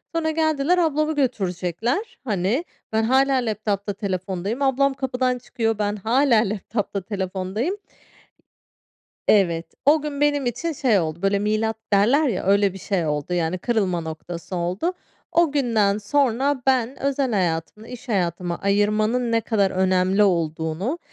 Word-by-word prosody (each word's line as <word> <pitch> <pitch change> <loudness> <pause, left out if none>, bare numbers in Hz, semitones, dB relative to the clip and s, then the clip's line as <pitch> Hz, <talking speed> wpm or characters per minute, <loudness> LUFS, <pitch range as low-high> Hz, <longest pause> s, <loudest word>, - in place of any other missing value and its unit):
Sonra 315 -1 +1
geldiler, 315 +1 +1
ablamı 310 -2 +1
götürecekler, 235 - -1
hani, 210 - 0 0.3
ben 220 0 +2
hâlâ 265 +3 +3
laptop'ta 210 -4 -1
telefondayım 190 +4 -3
ablam 275 0 +2
kapıdan 255 -1 -1
çıkıyor, 225 -2 -2
ben 205 0 0
hâlâ 235 +4 +3
laptop'ta 205 -1 -3
telefondayım. 195 - -3 1.5
Evet, 170 -5 +3 0.2
o 295 +2 +5
gün 290 -1 -5
benim 290 -2 +2
için 275 +8 -2
şey 245 -8 +2
oldu, 160 0 -3
böyle, 195 0 +2
milat 215 +2 0 0.2
derler 250 +10 +4
ya, 220 -8 -1
öyle 200 -1 +3
bir - - -8
şey 190 -2 -1
oldu, 150 +3 -2
yani 175 +1 0
kırılma 190 -5 0
noktası 165 +3 -7
oldu. 180 - -1 0.4
O 335 -3 +3
günden 225 -8 +2
sonra 265 +4 +1
ben 260 -1 +1
özel 275 -2 0
hayatımla 185 +3 -2
iş 250 +1 -10
hayatımı 175 -3 -1
ayırmanın 215 +4 +1
ne 230 - +2
kadar 205 -4 +1
önemli 185 +2 +2
olduğunu, 170 - -1
215 Hz, 135 wpm, -23 LUFS, 190-265 Hz, 1.5 s, o